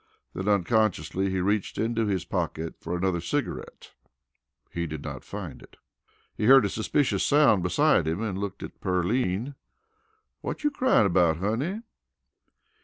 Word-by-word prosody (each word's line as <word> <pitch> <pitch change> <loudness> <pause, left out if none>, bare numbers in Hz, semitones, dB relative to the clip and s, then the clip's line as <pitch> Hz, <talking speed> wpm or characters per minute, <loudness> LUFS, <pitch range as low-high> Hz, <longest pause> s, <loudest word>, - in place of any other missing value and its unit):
Then, 95 - -4
unconsciously, 100 -3 +1
he 95 -1 -1
reached 100 +2 -1
into 115 0 0
his 95 -4 -1
pocket 80 +1 -3
for 85 +2 -4
another 90 -1 0
cigarette. 140 - -4 0.8
He 85 0 -3
did 75 -2 -6
not - - -6
find - - -7
it. - - -17 0.6
He - - -2
heard 135 -1 +7
a - - 0
suspicious 120 +7 0
sound 145 -9 +4
beside 90 - +2
him 80 +4 -1
and 105 -4 -3
looked 100 -2 -5
at - - -10
Pearline. 95 +6 0 0.9
"Whut - - -5
you 295 - +2
cryin' 260 - +3
about 85 -4 +3
honey?" 130 - -2
100 Hz, 145 wpm, -26 LUFS, 90-120 Hz, 0.9 s, heard